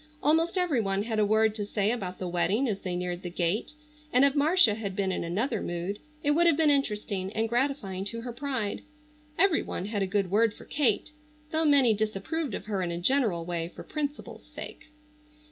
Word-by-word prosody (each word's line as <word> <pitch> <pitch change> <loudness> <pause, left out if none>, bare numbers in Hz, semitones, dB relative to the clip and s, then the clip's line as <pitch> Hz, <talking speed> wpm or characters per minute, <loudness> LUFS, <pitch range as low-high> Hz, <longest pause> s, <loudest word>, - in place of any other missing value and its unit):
Almost 325 +5 +3
every 340 -10 +2
one 195 -1 -1
had 220 -1 -2
a 210 - +4
word 220 0 +3
to 215 -1 -4
say 205 +1 0
about 190 -7 -4
the 185 - -4
wedding 185 +9 +1
as 205 -4 -2
they 185 -2 -4
neared 180 0 -3
the 180 - -5
gate, 175 - -1 0.4
and 255 +3 +5
if 280 - +3
Marcia 295 - +4
had 205 -3 -4
been 190 -1 0
in 185 - -2
another 210 +7 -1
mood 175 +4 -3 0.2
it 290 - +3
would 340 +3 +4
have 325 -4 +4
been 315 -2 +4
interesting 210 -8 -1
and 225 +1 0
gratifying 235 -6 -1
to 230 +3 -3
her 240 0 -6
pride. 250 -5 -3 0.6
Every 375 -2 +4
one 185 - -5
had 205 -1 -2
a 195 - +1
good 195 -1 0
word 220 +1 +3
for - - -13
Kate, 280 -1 +1 0.4
though 320 0 +1
many 275 -6 +6
disapproved 220 +7 -2
of - - -7
her 205 -3 -2
in 180 - -1
a 170 - -3
general 190 -4 +1
way 170 -1 -2
for - - -8
principle's 295 -1 -5
sake. - - -9
215 Hz, 210 wpm, -28 LUFS, 190-280 Hz, 0.6 s, many